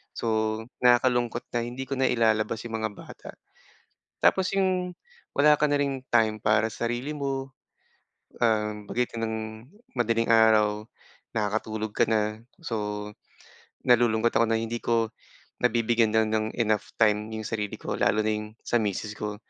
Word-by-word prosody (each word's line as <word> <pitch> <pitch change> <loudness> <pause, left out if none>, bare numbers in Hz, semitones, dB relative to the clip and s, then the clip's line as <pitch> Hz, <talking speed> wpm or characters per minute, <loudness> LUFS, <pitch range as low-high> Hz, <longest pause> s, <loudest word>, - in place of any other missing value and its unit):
So, 110 -1 0 0.2
nakakalungkot 120 -1 +3
na 120 - +1
hindi 125 +2 -5
ko 135 - -2
nailalabas 115 -4 +1
'yong 110 -1 -4
mga 110 - -1
bata. - - -11 0.9
Tapos, 190 -1 +3
'yung 185 -2 +1 0.4
wala 150 +1 +6
ka 150 - +3
na 145 - +2
ring 135 -2 -1
time 110 -2 +2
para 110 +1 +3
sarili 120 +5 -3
mo, 135 -2 -3 0.9
um, 105 -2 +1
pagitan 115 -2 -1
ng 110 0 -2 0.6
madaling-araw, 110 -2 +3 0.5
nakakatulog 110 0 -2
ka - - +5
na. 110 0 0 0.2
So, 105 -7 -3 0.8
nalulungkot 120 -1 +4
ako 115 - +4
na 110 - +2
hindi 115 +1 -3
ko 115 -1 +1 0.5
nabibigyan 115 -1 +2
na 110 0 +4
ng 110 0 -1
enough 110 -2 +1
time 105 0 +2
'yung 110 0 -5
sarili 105 -2 -3
ko. - - -4
Lalo 110 - +2
na 110 - +1
'yung 105 0 -4 0.2
sa 120 - +1
misis 105 +1 -2
ko. 105 0 -4
110 Hz, 140 wpm, -26 LUFS, 110-120 Hz, 0.9 s, wala